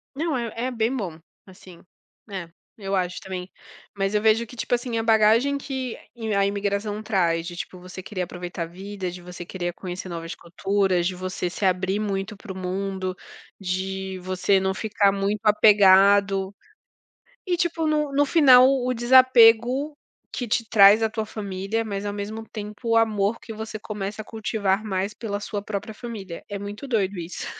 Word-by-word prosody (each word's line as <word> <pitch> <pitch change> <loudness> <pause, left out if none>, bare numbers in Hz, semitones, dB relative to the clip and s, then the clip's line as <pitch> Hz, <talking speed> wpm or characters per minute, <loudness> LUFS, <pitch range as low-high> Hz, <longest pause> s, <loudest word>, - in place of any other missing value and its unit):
Não, 310 -1 -1
é, 235 -2 -3
é 245 +3 -2
bem 230 +1 0
bom. 180 -10 -4 0.3
Assim, 185 -2 -15 0.5
é, 185 -4 -6 0.3
eu 195 -2 -3
acho 180 -1 -1
também. 185 -1 -6 0.5
Mas 195 0 -1
eu 210 - +2
vejo 220 +1 +3
que, 235 - -13
tipo 245 - -3
assim, 240 -1 -3
a 225 - 0
bagagem 225 +5 +4
que 265 -3 -5 0.4
a 200 - +3
imigração 200 +1 -2
traz, 170 -6 0
de 175 - -7
tipo, 180 0 -7
você 185 +1 -9
querer 190 -1 -4
aproveitar 175 -1 -5
a - - -3
vida, 190 +2 -6
de 180 0 -9
você 175 0 -9
querer 175 -1 -4
conhecer 185 +1 -7
novas 165 -1 -6
culturas, 185 0 0
de 185 - -3
você 185 0 -3
se 195 - -3
abrir 185 +2 +1
muito 205 0 -3
para 200 0 -10
o - - -10
mundo, 190 0 -3 0.4
de 190 0 -3
você 185 +1 +1
não 190 0 0
ficar 205 0 +2
muito 200 +2 -1
apegado 200 -2 +5 1.0
e 355 - +2
tipo, 335 -2 0
no 300 -2 0
no 285 +1 +3
final, 260 -5 +7
o 265 -2 +1
o - - 0
desapego 250 +3 +5 0.4
que 245 - -3
te 225 +1 0
traz 210 0 +7
à 220 - +3
tua 220 0 -3
família, 200 0 -3
mas 200 -2 -4
ao 205 - -2
mesmo 210 +2 -6
tempo, 210 +2 -6
o 230 - +4
amor 220 -1 +2
que 225 - -9
você 220 0 -6
começa 210 -1 -5
a - - -6
cultivar 215 -2 -1
mais 195 0 -2
pela 205 -3 -4
sua 205 0 -4
própria 210 +1 -5
família. 210 -7 -8
É 205 - -5
muito 205 +6 -7
doido 205 -6 0
isso. 170 +1 -6
205 Hz, 180 wpm, -24 LUFS, 190-225 Hz, 1.0 s, final